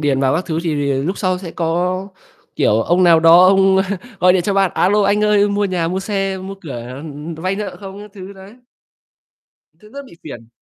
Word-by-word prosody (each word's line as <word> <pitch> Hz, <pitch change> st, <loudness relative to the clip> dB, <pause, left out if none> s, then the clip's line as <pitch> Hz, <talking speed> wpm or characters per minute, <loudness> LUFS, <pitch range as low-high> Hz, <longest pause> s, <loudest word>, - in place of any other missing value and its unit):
điền 140 Hz, -3 st, 0 dB
vào 130 Hz, -1 st, +1 dB
các 180 Hz, -, -2 dB
thứ 160 Hz, -2 st, -2 dB
thì 160 Hz, -3 st, -2 dB
thì 140 Hz, -1 st, -1 dB
lúc 145 Hz, +9 st, -2 dB
sau 185 Hz, -2 st, -1 dB
sẽ 180 Hz, -3 st, -8 dB
có, 180 Hz, +3 st, -2 dB, 0.5 s
kiểu, 110 Hz, +2 st, +2 dB
ông 180 Hz, +1 st, +2 dB
nào 165 Hz, -2 st, +5 dB
đó 170 Hz, +3 st, +7 dB
ông 190 Hz, 0 st, +4 dB, 0.4 s
gọi 180 Hz, 0 st, +5 dB
điện 180 Hz, -2 st, +1 dB
cho 200 Hz, +2 st, -1 dB
bạn: 195 Hz, -2 st, +2 dB
"A 180 Hz, -, +2 dB
lô, 210 Hz, +1 st, +2 dB
anh 200 Hz, +1 st, +1 dB
ơi 205 Hz, -1 st, +3 dB
mua 205 Hz, 0 st, -1 dB
nhà, 175 Hz, -4 st, -1 dB
mua 185 Hz, +2 st, -3 dB
xe, 195 Hz, -2 st, -3 dB
mua 190 Hz, +1 st, -8 dB
cửa, 135 Hz, -7 st, -7 dB, 0.2 s
ừm, 150 Hz, +2 st, -8 dB
vay 185 Hz, +4 st, -3 dB
nợ 205 Hz, -3 st, -5 dB
không?" 195 Hz, 0 st, -9 dB
Các 210 Hz, 0 st, -12 dB
thứ 195 Hz, 0 st, -10 dB
đấy. 195 Hz, +3 st, -14 dB, 1.3 s
Tự 210 Hz, 0 st, -18 dB
dưng 280 Hz, -1 st, -9 dB
bị -, -, -16 dB
phiền. 120 Hz, -7 st, -10 dB
185 Hz, 225 wpm, -17 LUFS, 165-195 Hz, 1.3 s, đó